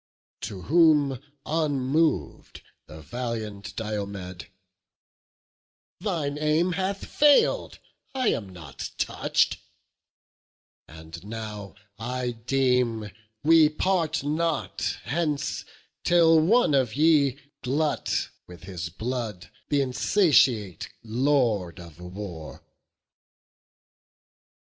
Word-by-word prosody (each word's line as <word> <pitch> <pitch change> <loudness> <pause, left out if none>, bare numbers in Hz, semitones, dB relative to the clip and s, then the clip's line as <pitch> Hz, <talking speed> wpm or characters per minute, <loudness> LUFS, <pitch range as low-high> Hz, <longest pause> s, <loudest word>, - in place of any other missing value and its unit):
To 95 -3 -6
whom, 150 -5 +4 0.3
unmov'd, 150 - 0 0.2
the 75 +1 -11
valiant 110 - -5
Diomed: 100 -5 -5 1.5
"Thine 160 -7 -2
aim 155 +4 +2
hath 190 +2 -2
failed, 300 - +3 0.4
I 255 -4 +2
am 100 -3 -2
not 80 -6 -8
touch'd; - - +1 1.3
and 80 +2 -11
now 105 -2 -7 0.2
I 125 +2 -2
deem 120 -3 0 0.3
we 160 0 +6
part 160 -2 0
not 155 +2 -1
hence 150 -1 -2 0.4
till 165 -2 +5
one 195 +2 +4
of 130 -5 +2
ye 145 -3 +4 0.2
Glut 145 +3 -1 0.2
with 90 0 -13
his 90 -3 -5
blood 110 -2 -5 0.2
th' - - -4
insatiate 130 - +2
Lord 115 -7 +1
of 85 -2 -12
War." 90 -3 -8
125 Hz, 85 wpm, -26 LUFS, 100-155 Hz, 1.5 s, we